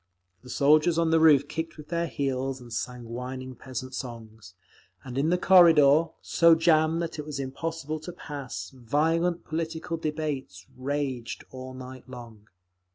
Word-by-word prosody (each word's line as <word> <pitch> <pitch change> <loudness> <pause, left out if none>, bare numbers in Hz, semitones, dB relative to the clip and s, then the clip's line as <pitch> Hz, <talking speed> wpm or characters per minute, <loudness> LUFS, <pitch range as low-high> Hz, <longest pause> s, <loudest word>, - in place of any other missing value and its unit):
The 130 - -14
soldiers 155 +5 +4
on 165 -1 +2
the 160 - +5
roof 145 -3 +6
kicked 160 +1 -5
with 150 -1 -11
their 170 0 -1
heels 135 -2 -2
and 120 -2 -11
sang 125 0 -4
whining 130 +2 -6
peasant 130 +1 -7
songs; 110 -7 -8 0.5
and 125 -2 -8
in 140 +4 +1
the 180 - +3
corridor, 165 -5 +6 0.2
so 170 -1 +5
jammed 160 0 +3
that 160 -2 -5
it - - -3
was 145 -2 -5
impossible 155 +3 -4
to 155 +3 -8
pass, 135 - -7
violent 160 +7 0
political 165 +1 -3
debates 150 - -4
raged 130 -2 -3
all 130 0 -8
night 130 0 -10
long. 115 -4 -11
140 Hz, 155 wpm, -27 LUFS, 130-160 Hz, 0.5 s, roof